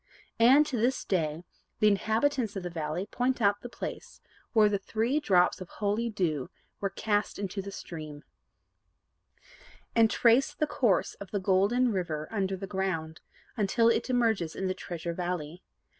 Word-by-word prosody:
And, 265 +6 +7
to 270 -5 -3
this 245 +4 0
day, 160 -3 -1 0.3
the 215 - +4
inhabitants 220 +3 +1
of 195 - -4
the 175 - -4
valley 160 +2 -3
point 250 +4 -1
out 205 -2 +2
the 245 - -7
place - - -7 0.3
where 215 -2 +5
the 205 -1 0
three 230 +8 0
drops 185 -10 +3
of 185 - -8
holy 215 +3 -1
dew 165 - -1 0.3
were 200 - -1
cast 205 +1 -1
into 195 0 -3
the 200 +1 -7
stream, 155 -6 -8 1.7
and 225 -1 +5
trace 245 +7 +3
the 305 - +1
course 235 - +1
of 200 - -7
the 200 - -1
Golden 200 +6 +2
River 165 -6 -2
under 195 -3 -1
the 195 - -5
ground, 190 -5 -3 0.3
until 230 +1 +3
it 235 - 0
emerges 225 -10 +1
in 190 - -3
the 185 - 0
Treasure 170 -2 -5
Valley. 175 -1 -4
200 Hz, 160 wpm, -29 LUFS, 180-230 Hz, 1.7 s, And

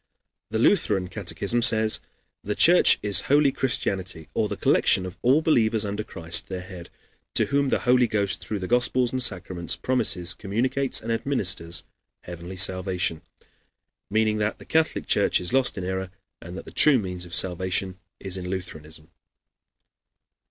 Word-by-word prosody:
The 110 - -2
Lutheran 105 - +1
catechism 105 +3 -1
says: 110 -1 +3 0.4
"The 105 +1 -3
Church 175 +2 +6
is 105 -1 +3
holy 145 0 +4
Christianity, 95 - -2
or - - 0
the - - -6
collection 95 - +2
of 90 - -8
all 135 +6 +3
believers 110 -8 +1
under 105 +1 -4
Christ, 80 -4 -2
their 95 -1 -6
head, 90 -2 -11 0.5
to - - +4
whom 140 0 0
the - - 0
Holy 125 -1 +3
Ghost 100 -3 -2
through 105 - -4
the 95 -2 -5
Gospels 125 +1 +2
and 130 - -1
sacraments 90 -6 -1
promises, 105 -7 +1
communicates, 125 +7 -1
and 115 - -5
administers 95 -9 +1 0.4
heavenly 90 +2 -9
salvation," 95 -3 0 0.9
meaning 110 +1 0
that 105 0 -2
the - - -15
Catholic 160 0 0
Church - - +2
is 90 +6 -5
lost 130 -4 +2
in 95 - -4
error, 95 0 -4 0.3
and 90 +2 -9
that - - -9
the - - -12
true 150 -3 +5
means 90 -5 -5
of 85 -1 -8
salvation 95 +1 0 0.2
is 95 -1 -4
in 90 -1 -6
Lutheranism. 80 -4 -8
100 Hz, 160 wpm, -24 LUFS, 90-120 Hz, 0.9 s, Church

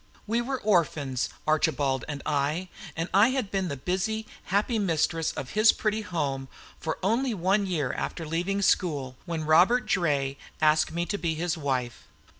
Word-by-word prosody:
We 230 +3 0
were 260 +2 -3
orphans, 150 - +1 0.2
Archibald 145 -4 +1
and 145 -2 -5
I; 150 +5 0 0.3
and 165 +1 -2
I 200 +4 +7
had 255 -6 -1
been 195 -2 0
the 140 -4 -4
busy, 190 +9 -2 0.2
happy 210 +4 +1
mistress 165 -3 +1
of 135 -2 -6
his 215 +1 +6
pretty 215 0 -1
home 145 -9 -2 0.3
for 160 - -3
only 230 +4 +1
one 195 +3 +1
year 150 -8 -1
after 165 - -4
leaving 180 +6 -1
school, 145 -10 +1
when 165 -2 -2
Robert 185 +11 +5
Draye 140 -6 0 0.2
asked 155 0 +3
me 170 +1 -1
to 205 +2 -3
be 165 -2 -1
his 170 +1 -1
wife. 130 -6 -3
170 Hz, 165 wpm, -27 LUFS, 150-200 Hz, 0.3 s, I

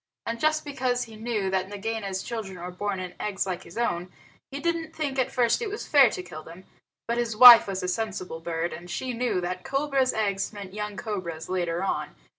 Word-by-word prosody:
And 230 0 -3
just 310 +2 +1
because 255 -3 -1
he 225 -1 -11
knew 215 -3 -2
that 190 0 0
Nagaina's 205 -2 -3
children 210 -6 -5
were 180 +1 -6
born 195 +1 -3
in 180 -1 -6
eggs 205 -2 -1
like 185 -1 -3
his - - -13
own, 180 -6 -1 0.4
he 280 - -6
didn't 330 0 -2
think 280 -4 -2
at 255 - +1
first 240 -2 +2
that 475 - -3
it - - -3
was 420 - -5
fair 275 -5 +6
to 180 - -5
kill 165 -3 -9
them. 170 +4 -12 0.4
But 235 +1 0
his 230 -3 -2
wife 245 -2 +11
was 190 -2 -3
a - - -1
sensible 185 -4 -3
bird, 165 +1 -3
and 175 +1 -9
she 250 +8 -3
knew 240 -5 0
that 180 +1 -4
cobra's 275 -1 +1
eggs 200 -3 -1
meant 200 -3 -9
young 210 -1 -5
cobras 170 -7 -5
later 175 -1 -1
on. 195 - -2
210 Hz, 220 wpm, -26 LUFS, 185-245 Hz, 0.4 s, wife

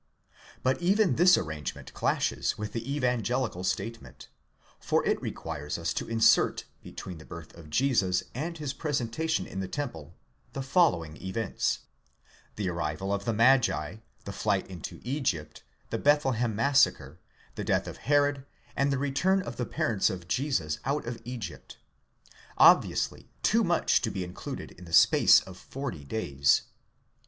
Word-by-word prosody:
But 130 +5 +1
even 195 +2 +3
this 180 +3 +6
arrangement 80 -3 -5
clashes - - 0
with 105 0 -5
the 115 +3 -4
evangelical 125 -6 -1
state 100 +5 -2
ment; - - -14 0.5
for - - 0
it - - +1
requires 75 +1 -5
us 85 0 -2
to - - -4
insert, 115 -1 +4 0.2
between 90 -4 -8
the - - -11
birth 85 -1 -10
of 85 -3 -13
Jesus 100 - +2
and 165 +7 -4
his 145 -4 -4
pre 150 +1 -4
sentation 155 +8 -1
in 95 - -6
the 95 - -3
temple, 85 - -6 0.4
the 135 - -4
following 130 - +2
events: 100 +3 -1 0.7
the 100 -3 -2
arrival 85 +3 -2
of 100 0 -3
the 115 - 0
magi, 120 -1 +3 0.3
the 100 - -5
flight 100 0 0
into 90 -4 -8
Egypt, 120 - -2 0.3
the - - -1
Bethlehem 130 -6 +2
massacre, 115 - +2 0.3
the - - -5
death - - 0
of - - -7
Herod, 145 -1 +2 0.3
and 140 0 +1
the 135 - +1
return 160 +8 +1
of 120 - -7
the 125 - -2
parents 110 -4 +1
of 90 -2 -6
Jesus 90 - -1
out 140 +3 -1
of 120 0 -5
Egypt—obviously 115 -9 0
too - - +3
much - - +2
to - - -1
be 95 - -3
in 90 0 -8
cluded - - -7
in 90 - -13
the 85 - -11
space - - +7
of 95 -1 -12
forty 135 - -6
days. 70 -6 +1
115 Hz, 155 wpm, -28 LUFS, 90-140 Hz, 0.7 s, space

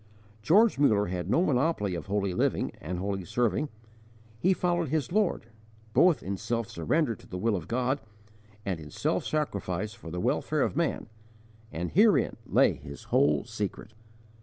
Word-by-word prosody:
George 200 - +4
Muller 105 -8 +4
had 90 -1 -4
no 165 - +3
monopoly 125 - +1
of 85 0 -5
holy 100 -1 0
living - - 0
and 90 +4 -4
holy 95 +1 -2
serving. 120 - 0 0.7
He 185 - +3
followed 175 -4 0
his 145 -4 -1
Lord, 205 - +1 0.5
both 175 -4 +4
in 100 +1 -3
self 115 +2 -2
surrender 120 - 0
to - - -15
the 90 - -6
will 110 +3 +1
of 85 -4 -5
God 130 +3 0 0.6
and 95 -4 -2
in 75 -1 -10
self - - -1
sacrifice 105 - -2
for 85 - -10
the 90 +2 -4
welfare - - +1
of - - -1
man, - - 0 0.7
and 85 +2 -4
herein 210 +3 +4
lay - - +4
his 70 +1 -10
whole 70 0 +4
secret. - - -5
105 Hz, 160 wpm, -28 LUFS, 90-150 Hz, 0.7 s, George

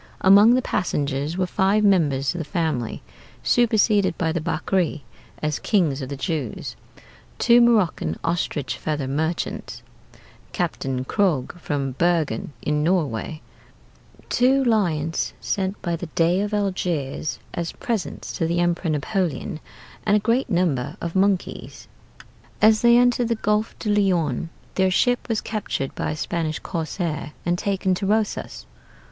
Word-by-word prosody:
Among 205 +5 +7
the 255 - +1
passengers 145 -1 -1
were 185 - +1
five 195 +3 +2
members 150 -9 +3
of 175 - -5
the - - -2
family 155 - -2 0.4
superseded 215 -5 +3
by 160 -2 0
the 165 0 -2
Bakri 160 -1 -1 0.4
as 150 -2 0
kings 160 -9 +1
of 130 - -5
the 140 - -5
Jews; 140 -3 -3 0.6
two 240 0 +5
Maroccan 195 - +2
ostrich 160 -5 -1
feather 150 -3 -2
merchants; 160 +5 -3 0.7
Captain 130 -1 -2
Krog 170 -8 +1
from 140 -4 -2
Bergen 160 -4 0
in 150 0 0
Norway; 155 -4 -1 0.8
two 265 +2 +3
lions 170 - 0
sent 190 0 -2
by 170 -1 0
the 170 +1 -6
Dey 175 +3 +3
of 205 0 -2
Algiers 180 -8 -1 0.2
as 170 -1 -3
presents 225 -7 -4
to 165 - -1
the 170 +1 0
Emperor 175 0 0
Napoleon; 170 +2 -1 0.4
and 205 -1 +3
a - - +2
great 235 +5 +1
number 165 -8 0
of 170 +1 -5
monkeys." 195 -1 -1 0.7
As 215 0 +5
they 235 0 +6
entered 245 -1 +3
the 230 - +1
Golfe 210 0 0
du 210 - -1
Lion 175 -7 +1 0.2
their 190 0 +2
ship 245 +7 +1
was 225 -2 0
captured 205 -10 -3
by - - -3
a 150 - -2
Spanish 155 -1 -2
corsair 160 -3 -4
and 175 0 +2
taken 190 0 0
to 195 +2 -2
Rosas. 215 +1 -1
175 Hz, 140 wpm, -23 LUFS, 155-205 Hz, 0.8 s, Among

